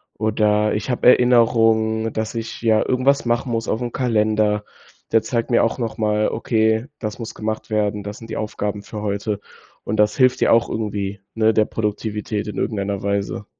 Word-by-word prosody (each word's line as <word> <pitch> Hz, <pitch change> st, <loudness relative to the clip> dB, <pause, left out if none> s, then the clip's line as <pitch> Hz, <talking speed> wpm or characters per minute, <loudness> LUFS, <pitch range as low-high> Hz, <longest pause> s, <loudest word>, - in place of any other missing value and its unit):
oder 105 Hz, -1 st, +1 dB
ich 105 Hz, +4 st, -3 dB
habe 125 Hz, -, +1 dB
Erinnerungen, 115 Hz, -3 st, +4 dB
dass 110 Hz, +1 st, -3 dB
ich, 115 Hz, 0 st, -5 dB
ja, 110 Hz, -2 st, +3 dB
irgendwas 135 Hz, +2 st, +2 dB
machen 120 Hz, +2 st, 0 dB
muss 115 Hz, -1 st, -2 dB
auf'm 120 Hz, +2 st, -2 dB
Kalender. 110 Hz, -4 st, +1 dB, 0.5 s
Der 115 Hz, -, +4 dB
zeigt 115 Hz, 0 st, -2 dB
mir 120 Hz, -, +4 dB
auch 115 Hz, -, 0 dB
nochmal: 110 Hz, -2 st, 0 dB
„Okay, 110 Hz, +1 st, +1 dB
das 105 Hz, -1 st, -5 dB
muss 115 Hz, -, -6 dB
gemacht 110 Hz, 0 st, -4 dB
werden, 105 Hz, -1 st, 0 dB
das 105 Hz, +1 st, -7 dB
sind 115 Hz, -, -11 dB
die -, -, -4 dB
Aufgaben 105 Hz, -1 st, -3 dB
für 105 Hz, 0 st, -7 dB
heute”, 100 Hz, 0 st, -2 dB, 0.4 s
und 110 Hz, -, -3 dB
das 105 Hz, 0 st, +3 dB
hilft 130 Hz, -1 st, +3 dB
ja -, -, +4 dB
auch 115 Hz, 0 st, +4 dB
irgendwie, 105 Hz, -2 st, -3 dB, 0.2 s
ne, 110 Hz, 0 st, +3 dB
der 110 Hz, 0 st, +3 dB
Produktivität 105 Hz, -1 st, -3 dB
in 105 Hz, -, -6 dB
irgendeiner 100 Hz, -3 st, -2 dB
Weise. 100 Hz, +1 st, -2 dB
110 Hz, 175 wpm, -21 LUFS, 105-115 Hz, 0.5 s, Erinnerungen